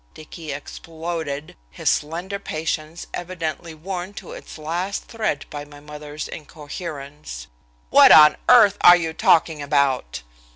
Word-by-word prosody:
Dicky 155 Hz, 0 st, -9 dB
exploded, 160 Hz, 0 st, -6 dB
his -, -, -7 dB
slender 175 Hz, +6 st, -1 dB
patience 160 Hz, -1 st, -4 dB
evidently 170 Hz, -2 st, -5 dB
worn 185 Hz, +4 st, -6 dB
to -, -, -9 dB
its -, -, -10 dB
last 175 Hz, +6 st, -3 dB
thread 215 Hz, -11 st, -3 dB
by 145 Hz, -1 st, -6 dB
his 145 Hz, 0 st, -15 dB
mother's 150 Hz, 0 st, -8 dB
incoherence, 150 Hz, -, -8 dB, 0.5 s
"what -, -, +8 dB
on 150 Hz, -1 st, +9 dB
earth 215 Hz, -5 st, +7 dB
are 175 Hz, -, +9 dB
you 165 Hz, -2 st, -3 dB
talking 160 Hz, -1 st, +2 dB
about?" 140 Hz, -, 0 dB
155 Hz, 125 wpm, -22 LUFS, 145-175 Hz, 0.5 s, on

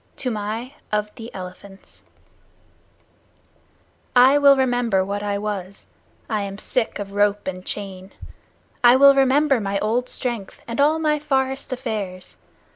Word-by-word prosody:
Toomai 225 Hz, +1 st, -4 dB, 0.2 s
of 210 Hz, 0 st, -1 dB
the 230 Hz, +1 st, -10 dB
Elephants 190 Hz, +1 st, -11 dB, 2.1 s
I 260 Hz, +3 st, +6 dB
will 280 Hz, -1 st, +6 dB
remember 245 Hz, -7 st, +1 dB
what 200 Hz, +1 st, -3 dB
I 205 Hz, -1 st, -2 dB
was, 200 Hz, -2 st, -6 dB, 0.4 s
I 215 Hz, -3 st, -1 dB
am 200 Hz, 0 st, -5 dB
sick 245 Hz, +2 st, -2 dB
of 200 Hz, -1 st, -6 dB
rope 205 Hz, 0 st, +1 dB
and 185 Hz, -1 st, -5 dB
chain 190 Hz, -1 st, -7 dB, 0.7 s
I 240 Hz, +1 st, +8 dB
will 280 Hz, +1 st, +8 dB
remember 275 Hz, 0 st, +3 dB
my 200 Hz, -1 st, -2 dB
old 235 Hz, +5 st, -1 dB
strength 235 Hz, -6 st, -4 dB
and 235 Hz, +3 st, -1 dB
all 305 Hz, +2 st, +4 dB
my 305 Hz, -1 st, +1 dB
forest 270 Hz, -2 st, -1 dB
affairs. 215 Hz, -8 st, -5 dB
220 Hz, 130 wpm, -22 LUFS, 200-260 Hz, 2.1 s, I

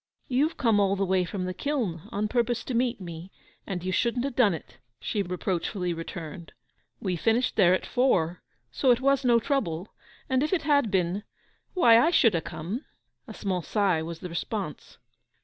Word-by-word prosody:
'You've 280 Hz, +6 st, +1 dB
come 225 Hz, -5 st, +3 dB
all 200 Hz, -1 st, +3 dB
the 195 Hz, 0 st, 0 dB
way 185 Hz, -1 st, +2 dB
from 185 Hz, +1 st, -4 dB
the 185 Hz, -, -3 dB
kiln, 210 Hz, -, -3 dB
on 210 Hz, +1 st, -1 dB
purpose 240 Hz, 0 st, 0 dB
to 260 Hz, -, -5 dB
meet 240 Hz, 0 st, +1 dB
me, 175 Hz, 0 st, -8 dB, 0.4 s
and 180 Hz, -3 st, -4 dB
you 185 Hz, -, -2 dB
shouldn't 240 Hz, +6 st, +1 dB
have 280 Hz, -3 st, -4 dB
done 210 Hz, -8 st, +4 dB
it,' -, -, -12 dB, 0.2 s
she 210 Hz, -, -2 dB
reproachfully 180 Hz, 0 st, -2 dB
returned. 165 Hz, -1 st, -7 dB, 0.5 s
'We 185 Hz, -3 st, -2 dB
finished 230 Hz, +7 st, +1 dB
there 185 Hz, -3 st, +5 dB
at -, -, -4 dB
four, 180 Hz, -10 st, +1 dB, 0.3 s
so 265 Hz, -, +1 dB
it 245 Hz, -1 st, +5 dB
was 275 Hz, 0 st, +2 dB
no 240 Hz, -2 st, +5 dB
trouble; 215 Hz, -, -2 dB, 0.3 s
and 260 Hz, -3 st, +1 dB
if 305 Hz, +5 st, 0 dB
it 355 Hz, -, +1 dB
had 285 Hz, -5 st, +3 dB
been—why, 205 Hz, -, +1 dB
I 315 Hz, -, +4 dB
should 235 Hz, -, +4 dB
ha' 165 Hz, -, +1 dB
come.' 195 Hz, -, -5 dB, 0.4 s
A -, -, -8 dB
small 185 Hz, -3 st, -2 dB
sigh 190 Hz, -3 st, +1 dB
was 165 Hz, 0 st, -6 dB
the 180 Hz, -, -6 dB
response. 170 Hz, 0 st, -5 dB
200 Hz, 185 wpm, -27 LUFS, 180-245 Hz, 0.5 s, there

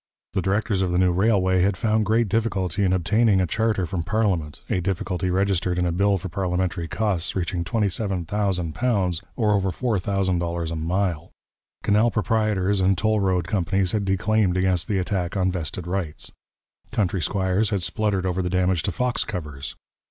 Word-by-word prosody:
The 95 Hz, -, 0 dB
directors 100 Hz, +1 st, 0 dB
of 95 Hz, -2 st, 0 dB
the 90 Hz, -, +1 dB
new 90 Hz, 0 st, +4 dB
railway 95 Hz, -1 st, +2 dB
had 95 Hz, 0 st, +2 dB
found 110 Hz, +1 st, +1 dB
great 115 Hz, +2 st, +3 dB
difficulty 100 Hz, -3 st, 0 dB
in 95 Hz, -, +2 dB
obtaining 100 Hz, +3 st, +3 dB
a 95 Hz, -, +2 dB
charter 110 Hz, 0 st, 0 dB
from 85 Hz, +1 st, -3 dB
parliament 90 Hz, -7 st, -1 dB
a -, -, 0 dB
difficulty 95 Hz, -1 st, -2 dB
registered 95 Hz, -1 st, +1 dB
in 90 Hz, -, +1 dB
a 85 Hz, -, +1 dB
bill 100 Hz, +3 st, +2 dB
for 95 Hz, -, -6 dB
parliamentary 90 Hz, -2 st, -1 dB
costs 100 Hz, -3 st, -1 dB
reaching 90 Hz, -1 st, -1 dB
£27,000, 95 Hz, -2 st, 0 dB
or 110 Hz, -3 st, +2 dB
over 100 Hz, -2 st, +2 dB
$4000 90 Hz, -5 st, -1 dB
a -, -, -3 dB
mile. 85 Hz, 0 st, -1 dB, 0.5 s
Canal 105 Hz, +3 st, +3 dB
proprietors 105 Hz, -2 st, +1 dB
and 95 Hz, 0 st, +3 dB
toll 110 Hz, +3 st, +2 dB
road 95 Hz, -3 st, +1 dB
companies 95 Hz, -1 st, +1 dB
had 105 Hz, -2 st, 0 dB
declaimed 95 Hz, 0 st, +1 dB
against 90 Hz, -2 st, +1 dB
the 100 Hz, -, 0 dB
attack 95 Hz, 0 st, -1 dB
on 95 Hz, -1 st, +2 dB
vested 90 Hz, 0 st, -4 dB
rights. 85 Hz, -5 st, -3 dB, 0.6 s
Country 95 Hz, -6 st, 0 dB
squires 95 Hz, +5 st, +1 dB
had 100 Hz, -5 st, -1 dB
spluttered 100 Hz, 0 st, 0 dB
over 95 Hz, 0 st, 0 dB
the 90 Hz, -, -1 dB
damage 90 Hz, -1 st, +1 dB
to 100 Hz, -, -2 dB
fox 125 Hz, +4 st, 0 dB
covers. 75 Hz, -9 st, -6 dB
95 Hz, 165 wpm, -24 LUFS, 90-105 Hz, 0.6 s, new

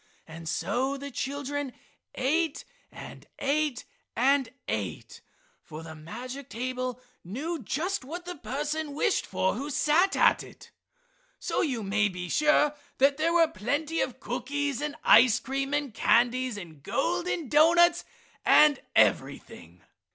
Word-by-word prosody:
And 165 Hz, 0 st, -8 dB
so 265 Hz, +9 st, -1 dB
the 280 Hz, +1 st, -7 dB
children 285 Hz, 0 st, -4 dB, 0.4 s
ate 310 Hz, +4 st, 0 dB, 0.3 s
and -, -, -11 dB
ate 285 Hz, -2 st, -1 dB, 0.3 s
and 265 Hz, +1 st, +2 dB, 0.2 s
ate, 100 Hz, -4 st, -4 dB, 0.4 s
for 155 Hz, +1 st, -9 dB
the 160 Hz, -1 st, -9 dB
magic 245 Hz, -, -8 dB
table 255 Hz, +1 st, -4 dB, 0.2 s
knew 285 Hz, -, -4 dB
just 320 Hz, -, -2 dB
what 345 Hz, +7 st, -7 dB
the 360 Hz, 0 st, -6 dB
person 295 Hz, +2 st, -4 dB
wished 405 Hz, +6 st, +1 dB
for 190 Hz, 0 st, 0 dB
who 275 Hz, +7 st, -5 dB
sat 325 Hz, +6 st, +2 dB
at -, -, +4 dB
it. -, -, -14 dB, 0.7 s
So -, -, -1 dB
you 255 Hz, -9 st, -1 dB
may 205 Hz, +1 st, +1 dB
be 180 Hz, -2 st, -6 dB
sure 300 Hz, -, +3 dB, 0.2 s
there 285 Hz, +5 st, +3 dB
were 340 Hz, -1 st, +5 dB
plenty 290 Hz, +9 st, -2 dB
of 260 Hz, -1 st, -3 dB
cookies 275 Hz, +2 st, -3 dB
and 295 Hz, -1 st, -3 dB
ice 235 Hz, +1 st, +6 dB
cream 270 Hz, +2 st, -3 dB
and 290 Hz, -4 st, -1 dB
candies 245 Hz, +1 st, +2 dB
and 165 Hz, -7 st, -10 dB
golden 345 Hz, -, -1 dB
doughnuts 340 Hz, +4 st, +5 dB, 0.4 s
and 300 Hz, -2 st, +6 dB, 0.2 s
everything. -, -, 0 dB
275 Hz, 130 wpm, -28 LUFS, 240-300 Hz, 0.7 s, ice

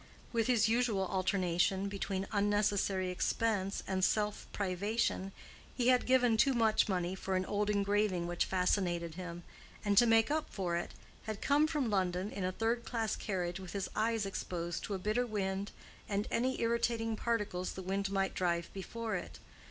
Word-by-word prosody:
With 230 Hz, -2 st, +1 dB
his 230 Hz, -3 st, +4 dB
usual 225 Hz, -4 st, +2 dB
alternation 185 Hz, 0 st, +1 dB
between 195 Hz, -1 st, -3 dB
unnecessary 200 Hz, -2 st, +1 dB
expense 200 Hz, +1 st, 0 dB
and 190 Hz, -1 st, -1 dB
self 210 Hz, +1 st, +1 dB
privation, 200 Hz, +1 st, -1 dB, 0.5 s
he 250 Hz, -1 st, +3 dB
had 250 Hz, -1 st, +4 dB
given 245 Hz, -3 st, +4 dB
too 270 Hz, +4 st, +4 dB
much 220 Hz, -2 st, +3 dB
money 180 Hz, -1 st, 0 dB
for 190 Hz, 0 st, -2 dB
an 185 Hz, 0 st, 0 dB
old 210 Hz, +1 st, 0 dB
engraving 200 Hz, -3 st, +1 dB
which 175 Hz, 0 st, 0 dB
fascinated 180 Hz, -3 st, 0 dB
him, 175 Hz, 0 st, -7 dB, 0.4 s
and 205 Hz, -1 st, +2 dB
to 240 Hz, -, +5 dB
make 225 Hz, +3 st, +4 dB
up 310 Hz, 0 st, 0 dB
for 180 Hz, -4 st, -2 dB
it, 170 Hz, -, -3 dB, 0.3 s
had 215 Hz, -2 st, -4 dB
come 290 Hz, +2 st, +3 dB
from 285 Hz, -8 st, -1 dB
London 185 Hz, 0 st, 0 dB
in 195 Hz, -, -4 dB
a 185 Hz, -, 0 dB
third 230 Hz, +4 st, 0 dB
class 225 Hz, -3 st, -1 dB
carriage 180 Hz, -3 st, -3 dB
with 185 Hz, -2 st, -8 dB
his 200 Hz, -2 st, -2 dB
eyes 225 Hz, -1 st, +1 dB
exposed 175 Hz, -3 st, -4 dB
to 205 Hz, -, -3 dB
a -, -, -1 dB
bitter 215 Hz, +6 st, 0 dB
wind 200 Hz, -2 st, -2 dB, 0.4 s
and 205 Hz, 0 st, -1 dB
any 255 Hz, +2 st, 0 dB
irritating 230 Hz, -1 st, 0 dB
particles 210 Hz, -6 st, -1 dB
the 190 Hz, -, -7 dB
wind 195 Hz, +1 st, -1 dB
might 195 Hz, -1 st, 0 dB
drive 170 Hz, -2 st, -1 dB
before 225 Hz, +3 st, -4 dB
it. -, -, -5 dB
200 Hz, 170 wpm, -33 LUFS, 185-225 Hz, 0.5 s, to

